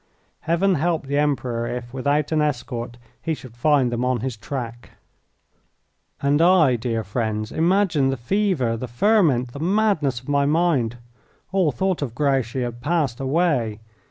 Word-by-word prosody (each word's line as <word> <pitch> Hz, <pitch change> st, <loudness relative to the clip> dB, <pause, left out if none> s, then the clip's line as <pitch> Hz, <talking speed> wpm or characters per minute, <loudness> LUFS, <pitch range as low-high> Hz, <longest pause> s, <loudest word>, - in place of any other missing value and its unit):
Heaven 170 Hz, +4 st, +1 dB
help 170 Hz, -3 st, 0 dB
the 140 Hz, +1 st, 0 dB
Emperor 125 Hz, -5 st, -1 dB
if, 120 Hz, 0 st, -5 dB
without 145 Hz, +3 st, 0 dB
an 155 Hz, -1 st, +2 dB
escort, 120 Hz, -4 st, -3 dB, 0.2 s
he 160 Hz, -, -1 dB
should 125 Hz, -5 st, -13 dB
find 135 Hz, -1 st, +2 dB
them 120 Hz, +1 st, -1 dB
on 125 Hz, -2 st, 0 dB
his 130 Hz, -2 st, -3 dB
track! 120 Hz, +1 st, -7 dB, 1.3 s
And 145 Hz, +2 st, +3 dB
I, 165 Hz, -7 st, +5 dB
dear 115 Hz, -1 st, -2 dB
friends 110 Hz, +1 st, -2 dB
imagine 170 Hz, -4 st, +2 dB
the 135 Hz, -, -1 dB
fever, 140 Hz, -, 0 dB
the 125 Hz, +3 st, -5 dB
ferment, 130 Hz, -, +2 dB
the 140 Hz, -, -7 dB
madness 175 Hz, -, +1 dB
of 130 Hz, -, -20 dB
my 140 Hz, -1 st, +2 dB
mind! 145 Hz, -7 st, +1 dB, 0.5 s
All 190 Hz, -6 st, +2 dB
thought 185 Hz, +7 st, -1 dB
of 125 Hz, -5 st, -4 dB
Grouchy 135 Hz, -3 st, 0 dB
had 120 Hz, 0 st, -5 dB
passed 145 Hz, -4 st, 0 dB
away. 135 Hz, -6 st, 0 dB
135 Hz, 155 wpm, -22 LUFS, 120-160 Hz, 1.3 s, I